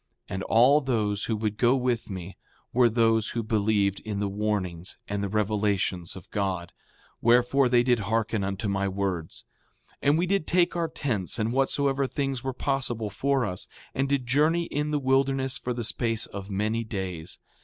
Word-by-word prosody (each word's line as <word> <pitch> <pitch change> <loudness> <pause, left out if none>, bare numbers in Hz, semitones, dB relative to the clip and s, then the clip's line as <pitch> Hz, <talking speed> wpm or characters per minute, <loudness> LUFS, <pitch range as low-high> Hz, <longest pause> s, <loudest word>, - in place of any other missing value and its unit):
And 95 - -4
all 125 +9 +5
those 105 -6 0
who 110 - 0
would 105 -1 -2
go 120 +1 +4
with 125 -3 -1
me 95 -1 -6 0.4
were 120 -1 +5
those 115 -1 +2
who 115 - 0
believed 105 -2 +1
in 105 -2 -4
the 100 - 0
warnings 100 -4 -2
and 100 0 -2
the 100 - -2
revelations 100 -4 0
of 95 0 -12
God; 95 -4 -2 0.5
wherefore, 125 +3 +4
they 120 -1 +4
did 120 -2 +3
hearken 110 0 0
unto 100 +2 -2
my 100 0 0
words. 95 -4 -3 0.5
5:7 - - -30
And 145 +2 +3
we 175 - +2
did 195 -2 0
take 175 -1 +3
our 170 -1 0
tents 125 - -2
and 115 +1 0
whatsoever 135 +1 +1
things 135 -2 -2
were 135 - -1
possible 125 -5 -1
for 135 +4 +1
us, 90 -3 -5 0.3
and 135 +1 0
did 140 -3 +1
journey 155 +7 +3
in 150 -2 -2
the 150 - +1
wilderness 135 -1 +1
for 125 - -3
the 120 -1 -2
space 115 0 0
of 100 0 -8
many 105 +4 -1
days. 95 -6 -5
115 Hz, 180 wpm, -27 LUFS, 100-135 Hz, 0.5 s, all